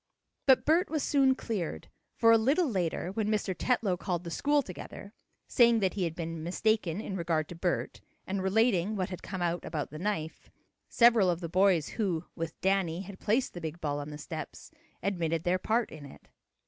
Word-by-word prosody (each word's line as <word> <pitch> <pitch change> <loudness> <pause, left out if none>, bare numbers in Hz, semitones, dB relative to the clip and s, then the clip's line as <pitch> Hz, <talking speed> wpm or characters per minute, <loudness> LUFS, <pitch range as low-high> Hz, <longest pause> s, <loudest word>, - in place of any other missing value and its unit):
But 265 -2 +5
Bert 335 +5 +3
was 310 -2 -1
soon 270 -2 +3
cleared, 180 - -4 0.3
for, 230 - +5
a 230 - +7
little 285 +9 +2
later, 185 - -1
when 210 +1 -1
Mr. 210 -3 0
Tetlow 215 -7 +1
called 175 -2 -2
the 170 - -6
school 290 - +2
together, 200 +1 -9 0.3
saying 235 -2 +5
that 190 -2 +1
he 190 -3 -1
had 165 -1 -4
been 165 -1 -5
mistaken 190 +1 0
in 200 -3 -5
regard 165 -4 0
to 175 - -7
Bert, 175 +1 -2 0.2
and 190 0 -2
relating 205 0 +2
what 185 -2 -2
had 180 - -6
come 190 -2 -4
out 175 0 -1
about 150 -4 -4
the 155 - -7
knife, 170 -5 -3 0.4
several 235 -5 +5
of 170 -1 0
the 170 -2 -5
boys 180 -3 +3
who, 180 -7 -2
with 165 -1 -5
Danny 190 -3 +1
had 195 0 -10
placed 230 +5 0
the 175 - -7
big 160 +1 -5
ball 145 -2 -2
on 145 +1 -6
the 150 - -7
steps, 150 - -8 0.3
admitted 165 -4 -1
their 180 +1 +1
part 225 +4 0
in 150 -3 -9
it. 135 - -16
185 Hz, 200 wpm, -30 LUFS, 165-220 Hz, 0.4 s, a